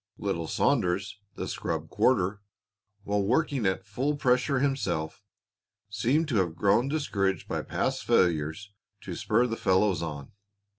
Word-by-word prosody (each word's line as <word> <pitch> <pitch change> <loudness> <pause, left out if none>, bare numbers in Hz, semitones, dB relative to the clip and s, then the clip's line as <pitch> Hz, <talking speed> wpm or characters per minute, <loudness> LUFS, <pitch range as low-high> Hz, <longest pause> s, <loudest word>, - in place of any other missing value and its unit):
Little 85 -5 -2
Saunders, 95 +5 0 0.2
the - - -4
scrub - - -3
quarter, 100 -4 +2 0.6
while 100 0 0
working 130 +1 +1
at 95 - -1
full 130 +9 -1
pressure 130 +1 +2
himself, 105 - -1 0.7
seemed 125 +10 +1
to 120 - +1
have 85 -4 0
grown 105 +7 +3
discouraged 100 - -1
by - - -2
past - - -2
failures 85 +3 +1 0.3
to - - -6
spur 115 +3 +1
the 115 -2 -3
fellows 95 -2 +2
on. 75 -4 -6
100 Hz, 135 wpm, -28 LUFS, 90-125 Hz, 0.7 s, grown